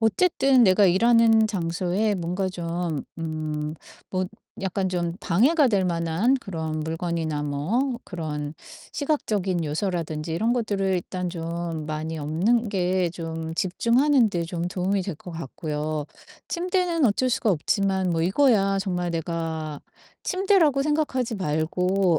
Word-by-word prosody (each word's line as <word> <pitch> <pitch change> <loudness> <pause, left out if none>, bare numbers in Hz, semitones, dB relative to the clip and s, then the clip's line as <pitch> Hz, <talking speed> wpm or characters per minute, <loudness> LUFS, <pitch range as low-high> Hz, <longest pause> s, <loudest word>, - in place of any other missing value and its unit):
어쨌든 260 - +4
내가 190 +1 +5
일하는 225 +3 +5
장소에 185 +2 0
뭔가 180 +2 -2
좀 170 -3 -3 0.2
음 155 -1 -3 0.4
뭐 185 0 0 0.3
약간 190 0 -1
좀 175 -2 -1
방해가 265 - +4
될 195 -5 +2
만한 170 +8 +1
그런 160 -7 -4
물건이나 160 -1 -2
뭐 165 - 0
그런 150 -4 -4 0.4
시각적인 205 - 0
요소라든지 160 -1 -2
이런 225 +8 +1
것들을 210 -5 0
일단 180 0 -2
좀 165 -2 -4
많이 155 +1 -3
없는 190 +11 +1
게 185 -2 +1
좀 165 -1 -5
집중하는 235 - +3
데 175 -4 -2
좀 170 +1 -3
도움이 190 +2 0
될 185 -2 -4
것 175 - -11
같고요. 155 -1 -4 0.4
침대는 355 -2 0
어쩔 255 +5 +1
수가 230 -2 +1
없지만 190 +2 +1
뭐 165 -1 0
이거야 195 0 +3
정말 180 -2 -1
내가 160 -2 -3 0.4
침대라고 370 -8 +3
생각하지 275 -6 0
말고 180 +2 +1
180 Hz, 270 characters per minute, -25 LUFS, 165-220 Hz, 0.4 s, 내가